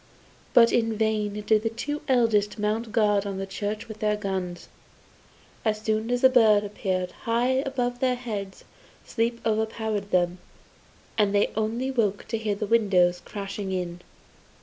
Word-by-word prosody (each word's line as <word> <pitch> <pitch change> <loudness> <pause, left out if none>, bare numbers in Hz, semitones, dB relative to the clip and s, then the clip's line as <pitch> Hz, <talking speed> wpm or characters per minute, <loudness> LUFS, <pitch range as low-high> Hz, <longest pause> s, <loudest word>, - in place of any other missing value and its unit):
But 230 -1 +7
in 225 -2 +1
vain 210 -1 0
did 215 0 +3
the 225 - 0
two 290 +6 -4
eldest 225 -6 +2
mount 215 +2 -1
guard 210 -3 +3
in 200 -1 -4
the 195 - -3
church 205 +3 -4
with 220 -1 -9
their 210 -1 +1
guns; 190 -3 -4 1.0
as 215 -1 0
soon 220 +1 -1
as 245 0 0
the 260 - +7
bird 220 -5 +5
appeared 185 -3 -2 0.2
high 250 +3 +2
above 245 -2 -2
their 255 -1 +2
heads, 210 -6 -6 0.4
sleep 235 0 -1
overpowered 220 -2 -1
them, 180 -1 +1 0.8
and 205 -1 +3
they 205 - +3
only 225 +4 -1
awoke 215 -6 0
to 225 - -1
hear 215 -2 -1
the 210 - -3
windows 185 -5 +3
crashing 200 -1 -5
in. 180 -1 -3
215 Hz, 155 wpm, -26 LUFS, 200-230 Hz, 1.0 s, But